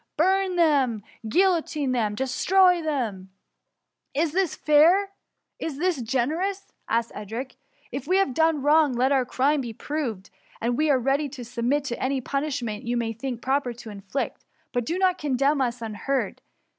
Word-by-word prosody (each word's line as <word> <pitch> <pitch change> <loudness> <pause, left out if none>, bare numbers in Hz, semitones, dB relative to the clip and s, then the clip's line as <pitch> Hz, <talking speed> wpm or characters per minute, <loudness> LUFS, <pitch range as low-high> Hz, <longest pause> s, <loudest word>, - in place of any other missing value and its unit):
burn 375 +2 +2
them! 275 - +2 0.2
guilloCine 325 - +1
them! 215 -4 0
destroy 355 - +3
them 235 - -3
r 190 - -40 0.4
*' - - -55
Is 325 - -1
this 370 -1 0
fair? 340 +7 +4 0.5
is 310 -4 -4
this 345 -3 0
generous?^ 310 - -1 0.2
asked 230 0 0
Edric. 225 +6 -5
^^ - - -24 0.4
If 270 +3 -5
we 370 +2 +3
have 390 -10 +2
done 320 -1 +2
wroi^, 295 -2 +4
let 260 +3 +2
our 265 -2 +3
crime 275 +4 +1
be 235 -3 -5
proved, 235 -8 -4 0.3
and 240 +1 0
we 305 +3 +1
are 275 - +5
ready 275 +4 0
to 255 -3 -8
submit 245 +4 0
to 245 -4 -4
any 265 +1 0
punishment 260 -5 -3
you 240 +1 -1
may 230 -1 -1
think 240 +1 -5
proper 265 -1 0
to 235 -2 -10
inflict; 200 +6 -4 0.3
but 245 -1 0
do 340 - -1
not 370 -1 +2
condemn 275 0 +1
us 240 -2 -1
unheard. 225 +5 -2
270 Hz, 170 wpm, -25 LUFS, 240-315 Hz, 0.5 s, are